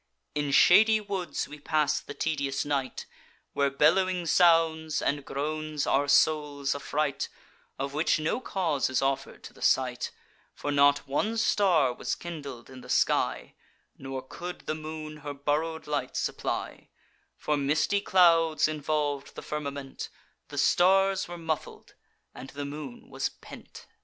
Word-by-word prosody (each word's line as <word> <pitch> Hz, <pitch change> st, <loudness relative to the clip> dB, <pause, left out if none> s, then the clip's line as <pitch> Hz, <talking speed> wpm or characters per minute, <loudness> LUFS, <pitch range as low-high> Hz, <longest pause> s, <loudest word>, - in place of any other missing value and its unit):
In 145 Hz, -1 st, -1 dB
shady 215 Hz, +9 st, +6 dB
woods 195 Hz, -7 st, -3 dB
we 150 Hz, -, -10 dB
pass 150 Hz, 0 st, +1 dB
the -, -, -10 dB
tedious 140 Hz, -4 st, -1 dB
night, 140 Hz, -3 st, -2 dB, 0.5 s
Where 140 Hz, 0 st, +2 dB
bellowing 175 Hz, +6 st, +2 dB
sounds 165 Hz, -2 st, +3 dB
and 145 Hz, 0 st, -1 dB
groans 155 Hz, +1 st, -3 dB
our 145 Hz, +1 st, +2 dB
souls 145 Hz, -1 st, +2 dB
affright, 145 Hz, 0 st, -2 dB, 0.5 s
Of 140 Hz, +1 st, -4 dB
which 155 Hz, +3 st, +2 dB
no 155 Hz, +10 st, 0 dB
cause 170 Hz, -, 0 dB
is 130 Hz, +1 st, 0 dB
offer'd 135 Hz, 0 st, -2 dB
to -, -, -10 dB
the -, -, -17 dB
sight; 125 Hz, -2 st, +1 dB, 0.5 s
For 145 Hz, -, -3 dB
not 145 Hz, 0 st, +4 dB
one 215 Hz, +12 st, -1 dB
star 175 Hz, -, +3 dB
was -, -, -3 dB
kindled 140 Hz, -8 st, -8 dB
in 130 Hz, -1 st, -11 dB
the -, -, -13 dB
sky, -, -, +1 dB, 0.4 s
Nor 135 Hz, -1 st, -6 dB
could 175 Hz, +6 st, -7 dB
the -, -, -3 dB
moon 155 Hz, 0 st, -7 dB
her 145 Hz, -1 st, -7 dB
borrow'd 155 Hz, +3 st, -1 dB
light 145 Hz, -4 st, -2 dB
supply; -, -, -3 dB, 0.5 s
For 150 Hz, -, 0 dB
misty 150 Hz, +8 st, +1 dB
clouds 165 Hz, -5 st, +4 dB
involv'd 150 Hz, -2 st, -2 dB
the -, -, -7 dB
firmament, 140 Hz, -2 st, -5 dB, 0.4 s
The -, -, -9 dB
stars 195 Hz, +1 st, +3 dB
were 175 Hz, 0 st, -7 dB
muffled, 160 Hz, -2 st, -5 dB, 0.4 s
and 130 Hz, -, -9 dB
the 145 Hz, 0 st, -6 dB
moon 140 Hz, -3 st, -8 dB
was -, -, -1 dB
pent. -, -, -13 dB
150 Hz, 140 wpm, -28 LUFS, 140-165 Hz, 0.5 s, shady